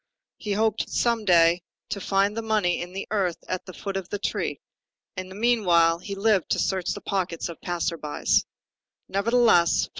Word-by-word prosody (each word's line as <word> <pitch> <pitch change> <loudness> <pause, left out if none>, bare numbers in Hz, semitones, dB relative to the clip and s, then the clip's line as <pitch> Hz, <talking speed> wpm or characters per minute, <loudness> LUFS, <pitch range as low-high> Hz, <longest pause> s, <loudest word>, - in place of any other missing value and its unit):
He 210 -2 -3
hoped 220 +1 0
some 235 -2 0
day 170 -1 +5 0.3
to 205 -1 -4
find 195 +2 +1
the 230 - -2
money 215 -6 +1
in 175 +1 -6
the 195 +1 -6
earth 190 -5 0
at 185 0 -4
the 185 - -8
foot 195 +1 -5
of 190 -2 -3
a 205 - -1
tree; 205 - -2 0.6
in 185 0 -6
the 190 - -10
meanwhile, 180 -8 +3
he 200 +2 -6
lived 200 -2 +2
to - - +1
search 190 -2 0
the - - -8
pockets 180 -4 -2
of 170 - -9
passers 170 -1 -2
by. 150 -1 -6
190 Hz, 175 wpm, -25 LUFS, 175-210 Hz, 0.6 s, day